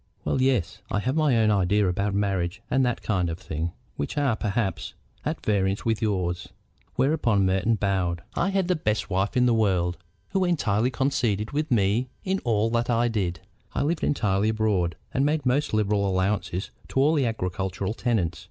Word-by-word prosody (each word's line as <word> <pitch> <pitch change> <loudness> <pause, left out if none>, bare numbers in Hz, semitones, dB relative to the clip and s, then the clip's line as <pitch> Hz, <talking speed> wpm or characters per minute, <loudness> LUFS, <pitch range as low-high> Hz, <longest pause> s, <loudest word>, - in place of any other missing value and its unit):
"Well, 130 - +1
yes. 130 -9 +1
I - - 0
have 125 +7 -1
my 150 -6 +3
own 110 -1 +4
ideas 100 +1 +2
about 100 +3 0
marriage 95 -3 -1
and 130 +1 +3
that 120 -2 -1
kind 90 -5 0
of 80 - -3
thing, 80 -1 -4 0.3
which 70 - -3
are, 140 -6 +2
perhaps, 105 -1 -2 0.3
at - - -3
variance 100 -1 +1
with 115 -2 0
yours." 90 -5 -1 0.5
Whereupon 125 -8 +2
Merton 95 +5 +2
bowed. 95 -4 -1
"I 190 - +1
had 195 -2 +1
the 180 - +2
best 105 -9 -1
wife 95 +5 0
in 125 - +4
the 120 - +4
world, 90 -6 +1 0.3
who 190 - +1
entirely 125 - +1
coincided 120 -5 0
with 150 +1 -1
me 115 +1 +2
in 190 0 0
all 115 -2 +1
that 120 +1 0
I 120 0 +2
did. 90 -7 -2 0.3
I - - +1
lived 160 +2 -1
entirely 105 -6 +1
abroad, 105 -7 +1 0.2
and 135 - +2
made 150 0 +1
most 135 +4 +1
liberal 105 -2 +1
allowances 95 0 -1 0.2
to - - -1
all 145 +4 +4
the 140 -6 +2
agricultural 95 -1 -2
tenants. 95 -10 -1
105 Hz, 180 wpm, -26 LUFS, 95-125 Hz, 0.5 s, own